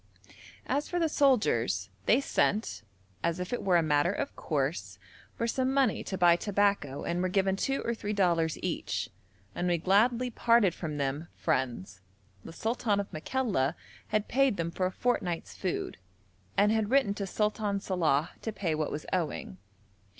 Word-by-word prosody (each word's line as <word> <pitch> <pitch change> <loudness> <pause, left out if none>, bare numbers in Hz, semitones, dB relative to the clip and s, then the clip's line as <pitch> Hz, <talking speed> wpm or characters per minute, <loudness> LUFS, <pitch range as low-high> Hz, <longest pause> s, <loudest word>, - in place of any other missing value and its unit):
As 285 +3 -1
for 355 - -1
the 335 -2 +2
soldiers, 120 - +2 0.2
they 235 - +5
sent, 215 -5 0 0.4
as 170 +1 -1
if 180 +5 -4
it 245 - -1
were 180 -3 +3
a 170 - +3
matter 150 +2 +2
of 280 +7 -4
course, 135 - -2 0.4
for 230 - -1
some 260 +3 0
money 270 -4 +2
to 190 - -3
buy 175 -2 +6
tobacco 200 -8 0
and 175 +1 -1
were 185 - 0
given 190 0 +2
two 270 +7 -1
or 235 - 0
three 210 -2 -4
dollars 170 -5 +1
each, - - -2 0.4
and 180 - -2
we 175 -1 +2
gladly 230 +8 +2
parted 230 -5 +3
from 155 -4 -5
them 140 +3 -2
friends. 120 - -2 0.4
The - - -9
sultan 220 +2 0
of 200 - -5
Makalla 170 - 0 0.3
had 215 0 0
paid 270 -4 +2
them 170 0 -2
for 185 +1 0
a - - -4
fortnight's 185 -6 -1
food, 185 - -3 0.6
and 205 +1 +5
had 220 -2 +1
written 265 -6 +3
to 200 -1 -4
Sultan 210 0 0
Salàh 170 -5 +1
to 220 - -3
pay 190 -6 -2
what 155 -1 -1
was 150 - -5
owing. 160 - -2
190 Hz, 170 wpm, -29 LUFS, 160-225 Hz, 0.6 s, buy